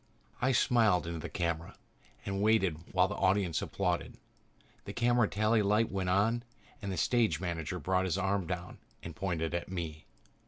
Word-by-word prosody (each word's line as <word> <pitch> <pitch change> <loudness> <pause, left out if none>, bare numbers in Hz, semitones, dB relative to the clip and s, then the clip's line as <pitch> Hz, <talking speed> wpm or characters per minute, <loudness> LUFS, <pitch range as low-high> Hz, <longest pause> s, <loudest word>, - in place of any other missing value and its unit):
I 130 +2 +3
smiled 110 -8 +3
into 85 -1 -4
the - - -6
camera 85 -1 -3 0.5
and 100 0 -2
waited 95 -7 +1
while 90 0 +4
the 105 - -4
audience 95 -3 +1
applauded. - - -2 0.7
The - - -6
camera 120 -1 +3
tally 110 +2 +2
light 105 +3 +2
went 95 -2 -1
on 105 +6 +2 0.4
and 100 -2 -3
the 95 - -3
stage 110 -3 +2
manager 85 -1 -3
brought 95 +1 0
his 95 0 0
arm 95 -2 0
down 90 0 -5 0.2
and 85 -1 -7
pointed 85 -2 -2
at 85 0 -3
me. 80 -4 -5
95 Hz, 165 wpm, -31 LUFS, 85-105 Hz, 0.7 s, while